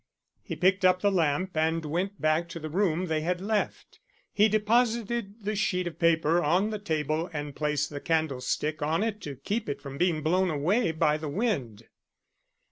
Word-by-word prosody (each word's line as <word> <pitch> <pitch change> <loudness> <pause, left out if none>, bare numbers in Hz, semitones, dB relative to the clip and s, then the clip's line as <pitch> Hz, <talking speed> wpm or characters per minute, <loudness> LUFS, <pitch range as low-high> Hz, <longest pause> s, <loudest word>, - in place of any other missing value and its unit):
He - - -6
picked 185 +2 +2
up 185 0 +4
the 205 - +4
lamp 170 0 0
and 160 +1 +1
went 180 +6 -2
back 155 +2 +1
to 165 - -6
the 155 -1 -6
room 180 -1 +1
they 160 -3 -1
had 175 +3 -1
left. 210 +2 -2 0.3
He 210 +1 +5
deposited 225 0 0
the 210 +1 -1
sheet 185 -3 0
of 175 - -6
paper 165 0 +3
on 180 +8 +2
the 215 - -3
table 160 -2 -1
and 145 -2 -5
placed 150 -1 -1
the 145 -1 -6
candlestick 155 -1 -1
on 160 +6 +1
it 215 -2 -2
to 145 -6 -6
keep 205 - -3
it 140 - -3
from 140 -1 -8
being 170 -4 +1
blown 180 +4 +2
away 170 +7 +1
by 150 -1 +2
the 155 -1 -5
wind. 140 - -2
170 Hz, 185 wpm, -28 LUFS, 155-200 Hz, 0.3 s, He